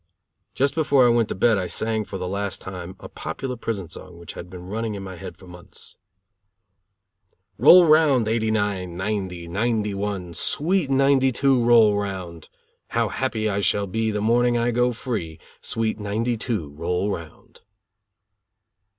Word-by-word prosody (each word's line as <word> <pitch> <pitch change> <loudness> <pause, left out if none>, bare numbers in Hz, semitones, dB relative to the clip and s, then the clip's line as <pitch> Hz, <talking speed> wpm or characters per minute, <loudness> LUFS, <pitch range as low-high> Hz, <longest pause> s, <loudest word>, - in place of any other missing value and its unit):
Just 140 +1 +1
before 145 -5 +3
I - - +5
went 115 -2 +2
to - - -3
bed 110 +1 +3
I 90 - -2
sang 110 +1 -2
for 95 - -6
the 90 -1 -4
last 100 +1 -3
time 90 -1 -8
a - - -9
popular 130 -2 -5
prison 110 -6 -4
song 85 +2 -11
which 85 -1 -10
had 90 - -9
been 90 -1 -10
running 110 +2 -3
in 100 - -6
my 95 -1 -7
head 85 - -9
for 95 - -15
months: 90 -1 -12 1.6
"Roll 180 0 +8
round, 155 -7 +4
'89, 105 -5 -1
'90, 95 -3 -3
'91, 100 -2 -2
sweet 160 - 0
'92 135 -1 +3
roll 115 -3 +6
around. 95 -5 -5 0.4
How - - 0
happy 115 -5 -1
I 100 -1 0
shall 100 0 +1
be 110 +3 -1
the 105 -1 -2
morning 120 +2 +3
I 120 +1 +1
go 125 +1 +2
free, 105 - -5 0.2
sweet 110 -1 -2
'92 110 - -2
roll 90 +5 -2
around." 85 -4 -9
105 Hz, 150 wpm, -23 LUFS, 95-120 Hz, 1.6 s, Roll